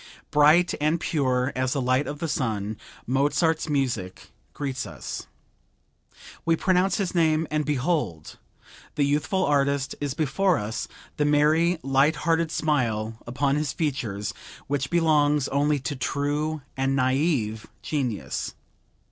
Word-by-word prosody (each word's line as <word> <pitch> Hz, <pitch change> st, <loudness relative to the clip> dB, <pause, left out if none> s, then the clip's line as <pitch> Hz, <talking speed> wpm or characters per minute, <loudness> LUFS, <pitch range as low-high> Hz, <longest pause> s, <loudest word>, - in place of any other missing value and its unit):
Bright 155 Hz, +4 st, +5 dB
and 155 Hz, +3 st, +2 dB
pure 130 Hz, -5 st, 0 dB
as 130 Hz, 0 st, 0 dB
the 140 Hz, -, -1 dB
light 130 Hz, +2 st, +1 dB
of 145 Hz, -, -4 dB
the 165 Hz, -, -3 dB
sun, 110 Hz, -7 st, -2 dB, 0.3 s
Mozart's 150 Hz, +5 st, +1 dB
music 120 Hz, -10 st, -2 dB, 0.2 s
greets 135 Hz, -6 st, -4 dB
us. 75 Hz, -9 st, -7 dB, 1.2 s
We 165 Hz, -, +3 dB
pronounce 185 Hz, +3 st, +2 dB
his 195 Hz, -4 st, -1 dB
name 160 Hz, -2 st, +2 dB
and 155 Hz, -1 st, 0 dB
behold! 135 Hz, -, -1 dB, 0.6 s
the 145 Hz, -, +2 dB
youthful 150 Hz, +7 st, +1 dB
artist 140 Hz, -1 st, +1 dB
is 140 Hz, -2 st, -2 dB
before 165 Hz, +5 st, +2 dB
us, 105 Hz, +1 st, -3 dB, 0.3 s
the 150 Hz, -, +2 dB
merry, 155 Hz, +4 st, +3 dB
light 135 Hz, +3 st, +3 dB
hearted 165 Hz, +1 st, +1 dB
smile 115 Hz, -9 st, -1 dB
upon 135 Hz, +3 st, 0 dB
his 150 Hz, -3 st, -1 dB
features, 120 Hz, -10 st, -2 dB, 0.3 s
which 135 Hz, -1 st, -2 dB
belongs 150 Hz, -4 st, +3 dB
only 145 Hz, +1 st, +2 dB
to 145 Hz, +2 st, -3 dB
true 145 Hz, +3 st, -1 dB
and 135 Hz, +1 st, 0 dB
naive 130 Hz, -5 st, 0 dB, 0.2 s
genius. 120 Hz, -, -3 dB
145 Hz, 130 wpm, -25 LUFS, 130-155 Hz, 1.2 s, Bright